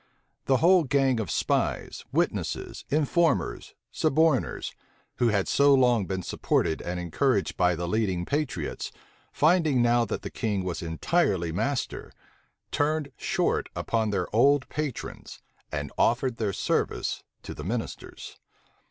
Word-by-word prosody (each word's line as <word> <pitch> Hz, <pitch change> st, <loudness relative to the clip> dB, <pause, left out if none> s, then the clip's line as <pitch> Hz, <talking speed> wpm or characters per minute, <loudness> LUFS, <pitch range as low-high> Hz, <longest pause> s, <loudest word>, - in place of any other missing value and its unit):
The 135 Hz, -, +3 dB
whole 175 Hz, +3 st, +5 dB
gang 135 Hz, -3 st, +2 dB
of 110 Hz, -, -3 dB
spies, -, -, -1 dB
witnesses, -, -, -2 dB
informers, 155 Hz, +3 st, +1 dB, 0.2 s
suborners, 155 Hz, -2 st, +1 dB, 0.4 s
who 120 Hz, -, +3 dB
had 100 Hz, -4 st, +1 dB
so 140 Hz, 0 st, +5 dB
long 120 Hz, -7 st, +3 dB
been 95 Hz, -1 st, -3 dB
supported 80 Hz, -, 0 dB
and 90 Hz, +1 st, -4 dB
encouraged 100 Hz, -, 0 dB
by 90 Hz, 0 st, +2 dB
the 85 Hz, +1 st, -3 dB
leading 95 Hz, -3 st, 0 dB
patriots, 145 Hz, -, -3 dB, 0.4 s
finding 155 Hz, -3 st, +3 dB
now 120 Hz, 0 st, +3 dB
that 105 Hz, -, -4 dB
the -, -, -5 dB
king 105 Hz, -4 st, -1 dB
was 90 Hz, -2 st, -3 dB
entirely 85 Hz, -, 0 dB
master, 135 Hz, -, -2 dB, 0.6 s
turned 150 Hz, 0 st, 0 dB
short -, -, 0 dB
upon 110 Hz, -2 st, 0 dB
their 105 Hz, -, 0 dB
old 140 Hz, +3 st, +4 dB
patrons 150 Hz, -5 st, -5 dB, 0.3 s
and 75 Hz, -2 st, -4 dB
offered 120 Hz, 0 st, +2 dB
their 105 Hz, -3 st, 0 dB
service -, -, -1 dB, 0.2 s
to -, -, -6 dB
the 75 Hz, -, -8 dB
ministers. 110 Hz, +6 st, -5 dB
120 Hz, 130 wpm, -27 LUFS, 95-145 Hz, 0.6 s, whole